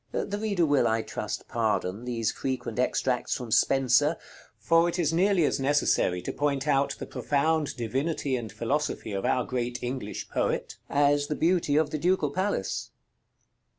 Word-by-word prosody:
The 205 0 -2
reader 200 -6 +1
will, 145 -2 +3
I 110 0 +1
trust, 105 0 -5
pardon 110 -2 -1
these 115 -3 -1
frequent 130 -2 -4
extracts 125 0 0
from 120 -3 -7
Spenser, 135 +6 +3 0.4
for 165 +1 +3
it 175 - -3
is 165 -3 +1
nearly 185 -1 +3
as - - 0
necessary 135 -10 +1
to - - -4
point 145 -1 -1
out 140 -1 +2
the - - -6
profound 150 +1 0
divinity 135 +4 -1
and 115 -4 -5
philosophy 140 -1 -2
of 100 -1 -3
our 125 - +1
great 125 -1 -3
English 120 -4 -4
poet, - - -2
as 145 0 +2
the 150 - -2
beauty 165 -3 +2
of 150 -1 +2
the 155 - -2
Ducal 170 -3 +1
Palace. 185 - -2
140 Hz, 160 wpm, -27 LUFS, 120-160 Hz, 0.4 s, will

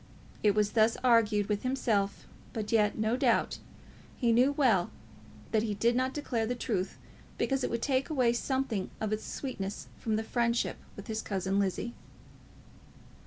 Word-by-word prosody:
It 205 -2 +3
was 210 -1 +2
thus 225 +1 +4
he - - -9
argued 220 -4 +4
with 205 -1 -1
himself, 220 -6 0 0.3
but 215 -3 -3
yet, 210 -2 +3
no 220 +2 +1
doubt, 255 - +1 0.6
he 235 -3 +2
knew 250 +4 +5
well 230 -11 +3 0.6
that 220 - +3
he 215 -2 -2
did 235 +4 +2
not 255 +1 +1
declare 245 -6 -2
the 245 - -1
truth 210 -6 -2 0.4
because 270 -1 0
it - - 0
would 235 0 -2
take 270 0 +1
away 255 -6 +3
something 240 -5 -1
of 215 -1 -1
its 215 - -3
sweetness 205 -8 -5
from 220 -2 -1
this 220 +1 -2
friendship 235 0 0 0.2
with 200 - -9
his 220 0 -3
cousin 195 0 -1
Lizzie. 200 +4 -1
225 Hz, 165 wpm, -30 LUFS, 210-250 Hz, 0.6 s, knew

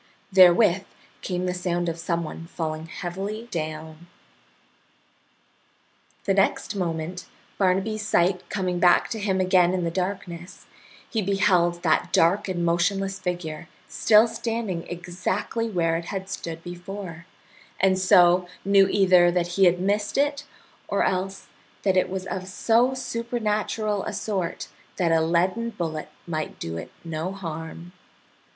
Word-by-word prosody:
Therewith 185 +1 +6 0.4
came 180 -1 -2
the 180 - -1
sound 175 -1 -1
of 165 0 -3
some 170 0 -1
one 165 +1 -8
falling 160 -1 -4
heavily 200 +5 -5
down. 155 0 -5 2.2
The 195 - +2
next 195 +1 +1
moment, 170 -1 -3 0.3
Barnaby's 195 +3 +1
sight 185 -2 +1
coming 185 -3 -1
back 175 0 +4
to 225 - -3
him 195 -2 0
again 185 -1 +4
in 180 - -1
the 170 - -1
darkness, 180 -1 -5 0.4
he 225 - -1
beheld 185 -3 +2
that 160 -3 +2
dark 195 +6 +3
and 175 -2 -1
motionless 195 +3 0
figure 175 -4 -4 0.2
still 220 +1 +5
standing 225 -6 -3
exactly 185 +6 -3
where 165 -5 +1
it 170 - -6
had 190 +1 -5
stood 165 -3 -6
before, 175 -1 -8 0.5
and 190 0 +3
so 180 -1 +5 0.2
knew 195 -1 +5
either 185 -3 +5
that 175 0 0
he 190 +2 +3
had 175 0 +4
missed 205 +4 0
it 290 0 +1 0.4
or - - +1
else 190 +1 -2 0.4
that 190 -2 +2
it 185 - +2
was 190 0 -4
of 185 0 -5
so 235 +7 +2
supernatural 220 -4 -2
a 215 - -4
sort 195 -4 -3 0.3
that 170 -2 +1
a 165 -1 +4
leaden 180 +8 +1
bullet 165 -8 -4 0.2
might 155 -2 -4
do 80 0 -5
it - - -7 0.2
no 165 +2 -3
harm. 165 -2 -7
185 Hz, 140 wpm, -25 LUFS, 170-200 Hz, 2.2 s, Therewith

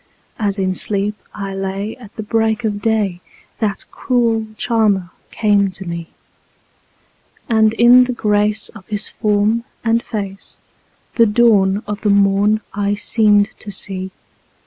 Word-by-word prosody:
As 205 -2 0
in 190 -1 0
sleep 200 +2 +1 0.2
I 195 -1 -6
lay 195 +2 -4
at 235 -5 -15
the 215 - -5
break 220 +1 0
of 205 -2 -2
day 205 -6 0 0.4
that 210 -3 -2
cruel 230 -4 0
charmer 210 -6 +1 0.2
came 205 -2 +2
to 190 +1 -8
me, 170 -1 -5 1.4
And 220 -2 +3
in 245 +2 +6
the 250 - -3
grace 210 -1 0
of 195 -5 -14
his 210 -1 -1
form 210 +2 0 0.2
and 230 0 +2
face 200 -5 -6 0.6
the 230 -1 +6
dawn 210 -3 +3
of 210 0 -5
the 210 - 0
morn 200 +2 +3
I 205 0 0
seemed 205 -1 +3
to 210 - -9
see. 190 -1 -3
210 Hz, 140 wpm, -18 LUFS, 195-220 Hz, 1.4 s, in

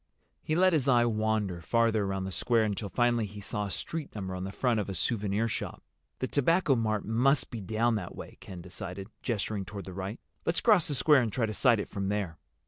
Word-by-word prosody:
He 155 - -1
let 185 +1 +4
his 145 -4 +2
eye 120 -2 +5
wander 110 -5 0
farther 115 +2 +2
around 95 -1 -2
the 95 - -4
square 115 +6 +2
until 105 -1 -2
finally 120 -2 +2
he 105 +1 -10
saw 105 +1 -3
a - - -6
street 160 - -5
number 95 -3 -4
on 90 0 -4
the 95 - -5
front 120 +1 +1
of 100 - -3
a 95 - -4
souvenir 105 +5 0
shop. - - -4 0.3
"The 130 - -2
Tobacco 150 +1 +3
Mart 110 -3 0
must 125 +6 +2
be 115 - -5
down 110 +4 +1
that 90 -4 -6
way," - - -10
Ken 90 -2 -9
decided, 95 +2 -7
gesturing 105 -3 -2
toward 100 +2 -7
the 95 - -8
right. 95 +5 -5 0.2
"Let's 165 - +1
cross 210 -8 +4
the 145 - -1
square 145 +1 +5
and 115 -3 -1
try 120 0 +1
to 110 - -3
sight 120 -1 +4
it - - -3
from 100 -1 -3
there." 100 -6 -2
110 Hz, 225 wpm, -29 LUFS, 100-120 Hz, 0.3 s, eye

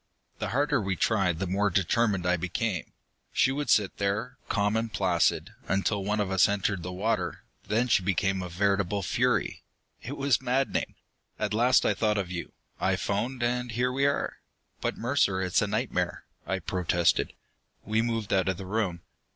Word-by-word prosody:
"The - - -2
harder 145 +1 +1
we 95 -2 -1
tried, 90 -4 +1
the 95 - -2
more 100 +3 +1
determined 100 0 +1
I 90 0 +3
became. 90 +2 -2 0.4
She 130 - +3
would 145 +2 -3
sit 105 -3 +3
there, 100 +5 -1
calm 105 0 +1
and 115 0 -1
placid, 90 -5 +1
until 100 +1 0
one 105 +2 0
of 100 -2 0
us 95 0 +5
entered 100 -2 0
the 90 +2 -5
water. 95 0 -1 0.2
Then 115 +4 +1
she 110 - +4
became 95 0 0
a 90 - -5
veritable 100 +2 +1
fury. - - 0 0.4
It 140 +4 -6
was 140 -2 +2
maddening. 130 +1 0 0.4
"At 110 -1 -1
last 120 +3 +4
I - - +3
thought 105 -1 +1
of 95 -3 -2
you. 85 -1 -5 0.3
I - - +2
phoned, 120 +5 -2
and 125 0 -1
here 125 +3 +1
we 135 +2 +2
are!" 140 - -1 0.4
"But, - - -1
Mercer, 115 -6 +1
it's 90 -1 +2
a 105 - +1
nightmare!" 100 -5 -1 0.2
I 95 - 0
protested. 90 -2 +1 0.5
We 110 +2 +1
moved 115 -3 -1
out 95 0 +2
of 95 - -1
the 95 - -7
room. 95 -4 -2
100 Hz, 175 wpm, -28 LUFS, 95-115 Hz, 0.5 s, us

